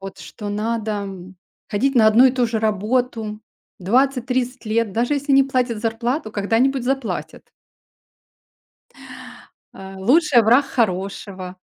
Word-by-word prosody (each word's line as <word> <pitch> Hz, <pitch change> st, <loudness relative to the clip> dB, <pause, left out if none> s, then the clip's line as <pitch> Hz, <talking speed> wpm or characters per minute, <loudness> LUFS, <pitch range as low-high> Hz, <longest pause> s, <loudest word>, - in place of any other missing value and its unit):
Вот 195 Hz, 0 st, -9 dB
что 210 Hz, -, -8 dB
надо, 220 Hz, +2 st, -2 dB
м, 190 Hz, -1 st, -9 dB, 0.3 s
ходить 270 Hz, +7 st, 0 dB
на 225 Hz, -3 st, +5 dB
одну 225 Hz, +4 st, +5 dB
и 255 Hz, -, +2 dB
ту 250 Hz, -2 st, +1 dB
же 225 Hz, -1 st, -2 dB
работу 220 Hz, +1 st, -1 dB, 0.4 s
20-30 250 Hz, +4 st, 0 dB
лет, 215 Hz, -1 st, 0 dB
даже 240 Hz, +7 st, 0 dB
если 285 Hz, 0 st, -1 dB
не 275 Hz, 0 st, +6 dB
платят 250 Hz, -4 st, -1 dB
зарплату, 230 Hz, +2 st, -2 dB
когда-нибудь 235 Hz, +6 st, 0 dB
заплатят. 270 Hz, -2 st, -4 dB, 2.2 s
А 195 Hz, 0 st, -10 dB
лучший- 255 Hz, -, +4 dB
враг 245 Hz, +6 st, +4 dB
хорошего. 190 Hz, -4 st, -3 dB
230 Hz, 125 wpm, -20 LUFS, 205-255 Hz, 2.2 s, не